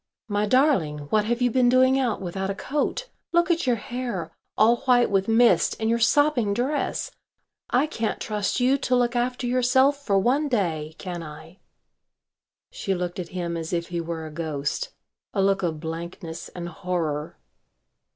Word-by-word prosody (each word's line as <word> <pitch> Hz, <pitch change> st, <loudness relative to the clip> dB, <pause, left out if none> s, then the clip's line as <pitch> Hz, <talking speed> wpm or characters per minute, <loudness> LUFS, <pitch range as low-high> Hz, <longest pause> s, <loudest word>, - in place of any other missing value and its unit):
"My 205 Hz, 0 st, 0 dB
darling, 255 Hz, -, +3 dB
what 215 Hz, -1 st, +3 dB
have 240 Hz, +2 st, 0 dB
you 245 Hz, -, +3 dB
been 250 Hz, 0 st, +4 dB
doing 260 Hz, +1 st, +4 dB
out 245 Hz, -5 st, 0 dB
without 190 Hz, +2 st, -3 dB
a 195 Hz, -, -2 dB
coat? 300 Hz, -, -2 dB, 0.2 s
Look 345 Hz, +1 st, +3 dB
at 335 Hz, -3 st, 0 dB
your 245 Hz, -, +4 dB
hair 225 Hz, -7 st, -5 dB, 0.2 s
all 230 Hz, +2 st, +5 dB
white 245 Hz, -3 st, +3 dB
with 195 Hz, -1 st, +2 dB
mist 230 Hz, +1 st, +4 dB
and 220 Hz, 0 st, +1 dB
your 235 Hz, -, +1 dB
sopping 240 Hz, -4 st, +3 dB
dress. 265 Hz, +6 st, -1 dB, 0.6 s
I 255 Hz, +4 st, +3 dB
can't 230 Hz, -8 st, -3 dB
trust 210 Hz, +2 st, -1 dB
you 260 Hz, +3 st, +3 dB
to 255 Hz, -1 st, +1 dB
look 245 Hz, 0 st, +1 dB
after 250 Hz, +1 st, -1 dB
yourself 260 Hz, +3 st, +3 dB
for 200 Hz, -6 st, +2 dB
one 260 Hz, +9 st, +2 dB
day, 160 Hz, -, -1 dB
can 175 Hz, -3 st, -5 dB
I?" 160 Hz, +3 st, -11 dB, 1.1 s
She 195 Hz, -, -2 dB
looked 180 Hz, 0 st, -4 dB
at 175 Hz, -2 st, -5 dB
him 170 Hz, -1 st, -2 dB
as 165 Hz, +1 st, -4 dB
if 170 Hz, -1 st, -2 dB
he 170 Hz, -1 st, -2 dB
were 165 Hz, -1 st, -5 dB
a 155 Hz, -, -8 dB
ghost. 155 Hz, -, -3 dB, 0.5 s
A 195 Hz, -, +2 dB
look 195 Hz, 0 st, +2 dB
of 165 Hz, -4 st, -2 dB
blankness 165 Hz, +1 st, -6 dB
and 175 Hz, -1 st, -7 dB
horror. 160 Hz, -3 st, -3 dB
210 Hz, 170 wpm, -25 LUFS, 170-250 Hz, 1.1 s, all